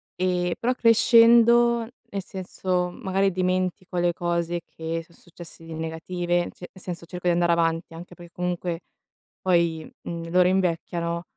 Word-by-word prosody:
Ehm, 180 -1 0
però 250 +2 +1
crescendo, 235 0 +5 0.2
nel 200 -4 -4
senso, 185 -2 -2
magari 195 +2 0
dimentico 185 0 -1
le 175 0 +2
cose 170 0 -1
che 165 0 -5
so' 170 - -22
successe 170 -1 -13
di 165 - -9
negative, 175 +2 -2
cioè 180 - -11
nel 185 - -12
senso 175 -2 -6
cerco 180 +1 -5
di 175 - +4
andare 170 0 +2
avanti, 165 0 0
anche 175 +2 -10
per 175 -1 -13
comunque 180 -1 -3 0.6
poi, 170 -3 +1 0.2
mhmm, 165 0 -5
loro 180 0 +5
invecchiano 170 -2 -1
175 Hz, 150 wpm, -25 LUFS, 170-185 Hz, 0.6 s, crescendo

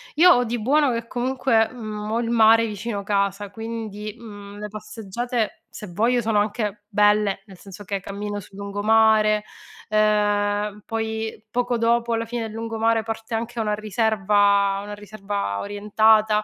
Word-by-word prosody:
Io 360 +4 +7
ho 245 - +4
di 235 0 -2
buono 285 +3 +3
che 230 0 -4
comunque, 245 -2 +1
mhmm, 215 -3 -6
ho 230 - +1
il 230 - -3
mare 225 0 +5
vicino 210 -1 -4
casa 200 0 -1
quindi, 220 -1 -6
mhmm, 205 -3 -11
le 210 - -5
passeggiate, 215 +2 -4
se 210 - -9
voglio, 235 +6 +2
sono 220 -2 +1
anche 210 -1 -2
belle, 210 -1 +2
nel 190 -2 -13
senso 195 +2 -11
che 200 0 -3
cammino 205 +2 -5
sul 195 0 -14
lungomare, 215 +1 +3 0.5
ehm, 210 -1 +1
poi 220 0 -4
poco 245 0 0
dopo, 235 0 +1
alla 230 0 -1
fine 235 0 -4
del 220 - -5
lungomare, 225 0 0
parte 225 +1 -6
anche 230 +1 -4
una 210 -1 0
riserva 205 -2 +2
una 205 0 -7
riserva 205 - -4
orientata, 215 +1 +3
215 Hz, 155 wpm, -23 LUFS, 205-225 Hz, 0.5 s, Io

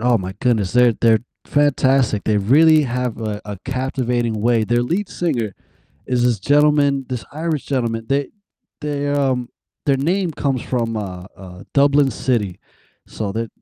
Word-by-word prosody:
Oh 120 0 +3
my 95 0 -6
goodness, 110 -7 +1
they're 125 -1 +5
they're 115 -2 +4 0.3
fantastic, 135 -6 +2
they've 105 -1 0
really 155 +2 +6
have 125 -2 -3
a 105 -2 -3
a 105 -2 -7
captivating 125 -3 -1
way, 115 0 +2
their 120 +2 +1
lead 180 +10 -1
singer 120 - -2 0.5
is 125 -1 +1
this 120 -4 +1
gentleman 145 +2 +3
this 125 -3 -4
Irish 155 -1 -3
gentleman, 115 -4 -2
they 140 0 0 0.5
they, 145 -1 -2
um 130 -4 0 0.4
their 140 -1 +3
name 175 +5 0
comes 140 -4 -1
from, 115 -3 -2
uh 90 -4 -6
uh, 90 -1 -11
Dublin 140 -1 +4
City, 110 -10 -1 0.5
so 105 -3 -4
they're 115 +3 -3
125 Hz, 155 wpm, -20 LUFS, 115-140 Hz, 0.5 s, really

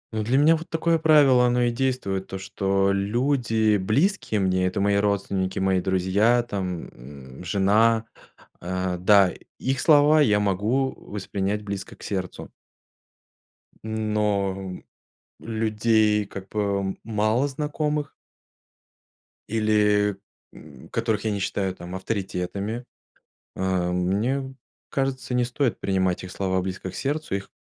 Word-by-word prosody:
Ну, 110 - 0
для 120 +5 +1
меня 155 +3 +5
вот 165 +1 -7
такое 165 0 +1
правило 145 -6 +5
оно 125 0 +2
и 120 - +2
действует, 120 -7 -2
то 95 - -5
что 95 0 0
люди 110 +1 +1
близкие 110 - +1
мне, 95 -1 +1
это 90 - -2
мои 100 0 +2
родственники, 100 -2 -1
мои 95 -1 +2
друзья, 95 +6 +2
там, 95 -6 -4
м, 65 +3 -12
жена 105 +5 +3 0.6
а, 90 0 -2
да, 95 0 +5 0.3
их 130 0 -1
слова 150 0 +5
я 105 -7 +4
могу 105 +7 0
воспринять 100 0 -3
близко 100 -1 -6
к - - -14
сердцу 95 -3 -4 1.3
но 105 -4 -1 0.6
людей 110 -1 +1
как 100 -1 -9
бы 100 -2 -1
малознакомых 140 +7 -1 1.4
или, 105 -2 +2 0.4
м, 70 -4 -14
которых 110 -2 -1
я 110 - +1
не 100 - -2
считаю 95 -1 -2
там 90 +1 -8
авторитетами, 100 +3 -3 0.7
а, 95 -2 0
мне 115 +10 -1 0.4
кажется, 135 -2 -2
не 125 0 +2
стоит 125 0 -1
принимать 95 -2 0
их 90 - -8
слова 95 -1 -1
близко 95 0 -5
к - - -14
сердцу, 145 -2 -2
их 95 - -8
105 Hz, 125 wpm, -24 LUFS, 95-120 Hz, 1.4 s, меня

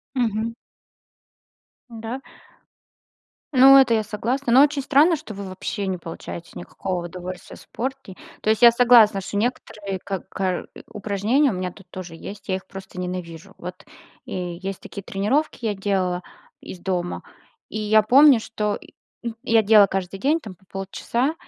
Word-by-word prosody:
Мгм. 230 -2 0 1.4
Да? 230 +2 -6 1.3
Ну 270 +1 +9
это 260 -3 +5
я 220 - +2
согласна, 235 +5 -2
но 265 +3 +8
очень 290 -1 +2
странно, 295 +5 +4
что 300 -7 -9
вы 200 -1 -7
вообще 195 +2 -4
не 190 - -1
получаете 170 0 -8
никакого 175 - -4
удовольствия 180 +1 -8
в - - -15
спорте. 260 -5 -6 0.3
То 215 - +1
есть 220 - +2
я 235 - +10
согласна, 235 -4 +5
что 200 - -3
некоторые 205 -4 -3
как 195 -3 -5
кар 185 -2 -2 0.2
упражнения 215 +8 +1
у - - -3
меня, 180 -1 -3
тут 190 -1 -17
тоже 180 -3 -8
есть, 205 +6 -10
я 190 - +1
их 190 - -10
просто 190 -1 -9
ненавижу. 180 0 -6
Вот, 180 +3 -9 0.4
и - - -6 0.3
есть 195 -1 -4
такие 200 - -8
тренировки, 235 +8 -1
я 220 - +1
делала 190 -2 -1 0.4
из 185 - -9
дома, 175 -1 -3 0.5
и - - -4
я 215 0 +4
помню, 270 +4 +7
что 210 -2 -2
й - - -16 0.5
я 225 -3 +3
делала 210 -1 +7
каждый 190 0 -3
день, 295 +7 +2
там, 210 -9 -9
по 185 - -29
полчаса, 235 +8 -2
205 Hz, 160 wpm, -23 LUFS, 185-240 Hz, 1.4 s, я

